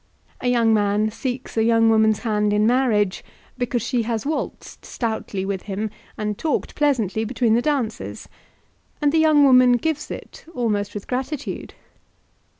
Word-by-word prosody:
A -, -, -1 dB
young 235 Hz, -2 st, +3 dB
man 210 Hz, 0 st, +1 dB
seeks 250 Hz, +3 st, -5 dB
a 220 Hz, -, +4 dB
young 225 Hz, 0 st, +4 dB
woman's 220 Hz, -1 st, +3 dB
hand 210 Hz, -3 st, +1 dB
in 210 Hz, +1 st, +3 dB
marriage, 220 Hz, -6 st, +2 dB, 0.3 s
because 245 Hz, -2 st, -2 dB
she 245 Hz, 0 st, 0 dB
has 225 Hz, 0 st, -2 dB
waltzed 305 Hz, +2 st, -4 dB
stoutly 220 Hz, -4 st, -3 dB
with 195 Hz, -1 st, -3 dB
him, 205 Hz, +2 st, -3 dB, 0.3 s
and 210 Hz, -1 st, -3 dB
talked 315 Hz, -, -1 dB
pleasantly 230 Hz, -8 st, +1 dB
between 230 Hz, 0 st, +1 dB
the 235 Hz, -, +3 dB
dances; 245 Hz, -5 st, -2 dB, 0.7 s
and 290 Hz, -1 st, +2 dB
the 320 Hz, -, +3 dB
young 310 Hz, -2 st, +5 dB
woman 255 Hz, -2 st, +6 dB
gives 300 Hz, +5 st, -1 dB
it, -, -, -9 dB
almost 205 Hz, -4 st, -1 dB
with 205 Hz, -, -5 dB
gratitude. 260 Hz, +3 st, -4 dB
230 Hz, 150 wpm, -22 LUFS, 215-255 Hz, 0.7 s, woman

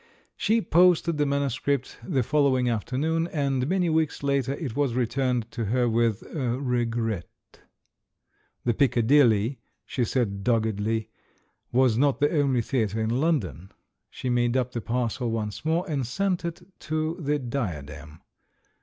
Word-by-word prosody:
She 225 Hz, +1 st, +1 dB
posted 170 Hz, -2 st, +3 dB
the 145 Hz, -, +2 dB
manuscript 140 Hz, -1 st, -1 dB
the 135 Hz, -9 st, 0 dB
following 135 Hz, -2 st, +2 dB
after 120 Hz, +2 st, -2 dB
noon, 160 Hz, +3 st, +1 dB
and 135 Hz, -5 st, -1 dB
many 185 Hz, -1 st, +1 dB
weeks 160 Hz, -3 st, 0 dB
later 140 Hz, -1 st, +1 dB
it 140 Hz, -5 st, -5 dB
was 140 Hz, -5 st, 0 dB
returned 125 Hz, -1 st, 0 dB
to 115 Hz, -2 st, -3 dB
her 120 Hz, +4 st, +1 dB
with 115 Hz, -2 st, +1 dB
"regret." 120 Hz, -, -1 dB, 1.4 s
The 120 Hz, -, +2 dB
Piccadilly, 120 Hz, -2 st, +3 dB, 0.3 s
she 125 Hz, -, -1 dB
said 105 Hz, -5 st, -1 dB
dog 115 Hz, 0 st, +2 dB
gedly, 110 Hz, +1 st, -2 dB, 0.6 s
was 125 Hz, -2 st, +3 dB
not 140 Hz, 0 st, +2 dB
the 145 Hz, +2 st, +2 dB
only 135 Hz, -5 st, +2 dB
theatre 110 Hz, -4 st, -1 dB
in 110 Hz, 0 st, 0 dB
London 100 Hz, -, -1 dB, 0.2 s
— -, -, -55 dB
she -, -, -6 dB
made 120 Hz, 0 st, +2 dB
up 125 Hz, -1 st, 0 dB
the 120 Hz, -, -4 dB
parcel 120 Hz, +1 st, -1 dB
once 110 Hz, -2 st, -3 dB
more 165 Hz, +4 st, 0 dB
and 145 Hz, -5 st, -1 dB
sent 180 Hz, +8 st, -1 dB
it 170 Hz, -1 st, -5 dB, 0.2 s
to 155 Hz, +2 st, -2 dB
the 150 Hz, -2 st, 0 dB
Diadem. 75 Hz, -, -5 dB
125 Hz, 145 wpm, -26 LUFS, 115-145 Hz, 1.4 s, posted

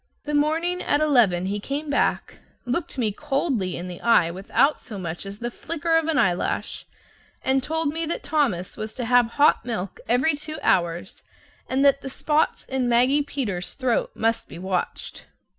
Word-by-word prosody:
This 295 Hz, -, -3 dB
morning 325 Hz, +5 st, +1 dB
at 290 Hz, -, +1 dB
eleven 240 Hz, -13 st, +3 dB
he 200 Hz, +2 st, -2 dB
came 280 Hz, +8 st, -4 dB
back, 285 Hz, -1 st, 0 dB, 0.3 s
looked 270 Hz, +4 st, -3 dB
me 225 Hz, -4 st, +1 dB
coldly 270 Hz, -, -1 dB
in 175 Hz, -, -5 dB
the 180 Hz, -1 st, -8 dB
eye 180 Hz, -8 st, +4 dB
without 195 Hz, -, +1 dB
so 215 Hz, -, -8 dB
much 175 Hz, +1 st, -5 dB
as 200 Hz, +1 st, -7 dB
the 240 Hz, +2 st, -4 dB
flicker 330 Hz, +4 st, -2 dB
of 325 Hz, -1 st, +2 dB
an 320 Hz, -4 st, +1 dB
eyelash, 185 Hz, -8 st, 0 dB, 0.6 s
and 265 Hz, 0 st, +2 dB
told 320 Hz, +2 st, -1 dB
me 325 Hz, +2 st, -2 dB
that 335 Hz, -, -3 dB
Thomas 275 Hz, -, 0 dB
was 215 Hz, 0 st, -6 dB
to 245 Hz, -, -3 dB
have 245 Hz, 0 st, +4 dB
hot 290 Hz, -4 st, +5 dB
milk 220 Hz, -6 st, -4 dB
every 255 Hz, +7 st, +4 dB
two 310 Hz, +1 st, -7 dB
hours 170 Hz, 0 st, 0 dB, 0.5 s
and 265 Hz, +2 st, +2 dB
that 275 Hz, 0 st, +4 dB
the 270 Hz, -, -6 dB
spots 300 Hz, +3 st, 0 dB
in 260 Hz, -2 st, -1 dB
Maggie 250 Hz, +5 st, +4 dB
Peters's 225 Hz, -11 st, -3 dB
throat 255 Hz, -4 st, 0 dB
must 225 Hz, +1 st, 0 dB
be -, -, -9 dB
watched. 185 Hz, 0 st, -4 dB
255 Hz, 175 wpm, -24 LUFS, 200-295 Hz, 0.6 s, hot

